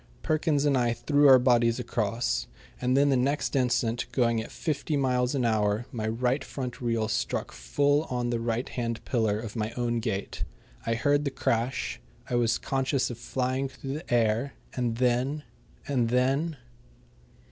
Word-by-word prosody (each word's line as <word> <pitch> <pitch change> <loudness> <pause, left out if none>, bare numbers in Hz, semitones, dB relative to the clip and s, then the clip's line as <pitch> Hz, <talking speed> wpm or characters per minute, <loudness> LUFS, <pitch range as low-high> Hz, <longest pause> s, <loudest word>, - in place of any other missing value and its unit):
Perkins 155 -2 +1
and 145 -2 +3
I 120 -2 +2
threw 145 +4 +3
our 130 -1 +9
bodies 120 -2 +3
across, 115 -1 -1 0.3
and 125 +1 +2
then 140 +1 +4
the 135 - +3
next 140 +4 0
instant, 120 -2 +1
going 115 -3 +2
at 110 - -9
fifty 155 -1 -2
miles 125 -1 +1
an 130 -3 +1
hour, 110 0 +1
my 110 -3 -3
right 125 +4 0
front 125 -3 -6
wheel 115 -2 0
struck 110 - -2
full 145 - +1
on 120 -3 -2
the 120 - 0
right 115 +1 -1
hand 115 -2 -4
pillar 110 -5 +1
of 110 -2 -7
my 110 -1 -1
own 120 -1 0
gate. 110 -3 -3 0.4
I 115 - +2
heard 145 +4 +2
the 140 - 0
crash. 115 - -1 0.3
I - - -5
was 120 -2 +2
conscious 135 -1 0
of 120 - -8
flying 130 +2 -1
through 135 0 -6
the 155 0 -7
air, 115 +3 +2 0.2
and 120 -2 -1
then 130 +4 +1 0.4
and 125 -5 +1
then 135 +6 +1
125 Hz, 170 wpm, -28 LUFS, 115-135 Hz, 0.4 s, our